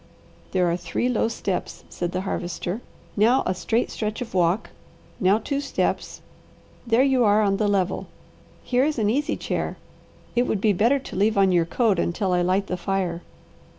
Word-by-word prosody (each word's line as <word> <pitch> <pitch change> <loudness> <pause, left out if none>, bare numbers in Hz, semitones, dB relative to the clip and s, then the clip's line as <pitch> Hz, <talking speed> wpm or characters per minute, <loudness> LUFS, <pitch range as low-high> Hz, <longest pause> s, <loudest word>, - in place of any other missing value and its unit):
"There 185 -1 +2
are 170 - 0
three 180 +7 -2
low 240 -2 +1
steps," 200 -4 -4
said 175 0 -3
the 185 0 -2
Harvester, 180 +2 -3 0.3
"now 230 +6 +4
a 185 - +1
straight 225 +6 -1
stretch 215 0 -3
of 245 - -6
walk, 180 +2 +1 0.5
now 190 +2 +4
two 280 +5 -2
steps; 280 - -2 0.7
there 230 +3 +4
you 265 -3 +3
are 210 0 +4
on 195 -1 +2
the 210 - +1
level. 195 -2 0 0.6
Here 250 +1 +2
is 300 0 0
an 215 -2 +2
easy 290 +5 0
chair. - - -3 0.6
It 245 +1 +2
would 210 - 0
be 210 +1 +3
better 230 +9 +3
to 270 - -8
leave 205 +2 +2
on 195 -1 +4
your 175 -2 +3
coat, 205 +1 +1
until 185 +2 0
I 180 - +2
light 185 +3 +1
the 185 - -3
fire." 180 -2 -2
205 Hz, 185 wpm, -24 LUFS, 185-230 Hz, 0.7 s, now